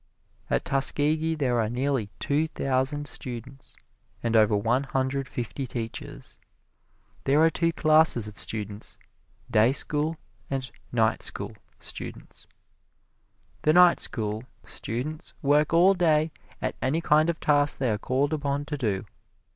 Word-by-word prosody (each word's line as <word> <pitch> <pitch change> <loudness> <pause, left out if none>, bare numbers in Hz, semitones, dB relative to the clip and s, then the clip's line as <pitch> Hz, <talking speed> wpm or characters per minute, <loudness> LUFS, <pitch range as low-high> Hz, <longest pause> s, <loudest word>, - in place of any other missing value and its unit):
At - - 0
Tuskegee 150 +4 +1
there 125 -6 +1
are 110 - -1
nearly 125 -3 -1
two 150 +3 0
thousand 135 0 -1
students, 130 +1 -8 0.5
and 115 -1 0
over 105 -1 +4
one 115 +6 +1
hundred 135 0 -1
fifty 125 +3 -5
teachers. 115 -2 -7 0.9
There 140 +2 +3
are 165 - +5
two 165 +1 +1
classes 155 -8 +5
of 105 - -8
students 105 -1 -1 0.5
"day 110 +3 +4
school" 150 +3 0 0.3
and 135 -1 -3 0.2
"night 110 -2 +1
school" 105 +2 -3 0.2
students. - - -8 1.1
The 155 - +3
night 180 0 +6
school 110 +1 -1 0.2
students 140 +8 -5
work 145 +2 +3
all 175 +4 +6
day 160 -3 +2 0.3
at - - -1
any 150 +6 0
kind 155 +1 +3
of 170 - -2
task 145 -1 +2
they 130 -4 0
are 105 - -1
called 135 +6 0
upon 145 -1 -2
to 150 0 -4
do. 105 -5 -1
135 Hz, 135 wpm, -26 LUFS, 115-155 Hz, 1.1 s, night